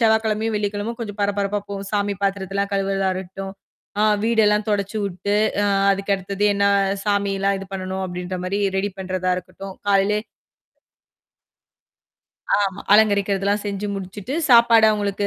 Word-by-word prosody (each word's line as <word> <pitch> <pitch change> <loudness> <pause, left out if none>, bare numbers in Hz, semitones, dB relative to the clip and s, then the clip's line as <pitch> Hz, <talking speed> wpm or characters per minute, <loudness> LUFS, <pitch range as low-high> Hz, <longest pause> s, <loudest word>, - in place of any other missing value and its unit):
செவ்வாய்க்கிழமையும், 220 -1 +2
வெள்ளிக்கிழமையும் 205 +3 -3
கொஞ்சம் 210 -2 -6
பரபரப்பா 200 0 0
போ 200 - -4 0.2
சாமி 205 -1 0
பாத்திரத்தலாம் 200 0 -1
கழுவுறதா 195 -1 0
இருக்கட்டும். 190 +1 -7 0.5
ஆ - - +4 0.2
வீடெல்லாம் 215 -2 +2
தொடைச்சு 205 0 -1
உட்டு, 195 +2 -3 0.3
அ - - +2 0.2
அதுக்க 195 +1 -1
அடுத்தது 195 +2 -3
என்னா 200 0 +2 0.4
சாமிலாம் 200 -1 +1
இது 195 - -8
பண்ணணும் 190 0 -4
அப்டின்ற 180 +1 -5
மாரி 190 +2 -1 0.2
ரெடி 200 +1 0
பண்றதா 185 -1 -2
இருக்கட்டும். 185 +1 -8
காலைலே 200 +1 +3 2.4
ஆமா. 195 0 -2
அலங்கரிக்கிறதெல்லாம் 200 -1 +3
செஞ்சு 200 0 -3
முடிச்சுட்டு, 195 +6 -6
சாப்பாடு 235 -2 +7
அவங்களுக்கு 205 -1 -1
200 Hz, 125 wpm, -22 LUFS, 195-210 Hz, 2.4 s, சாப்பாடு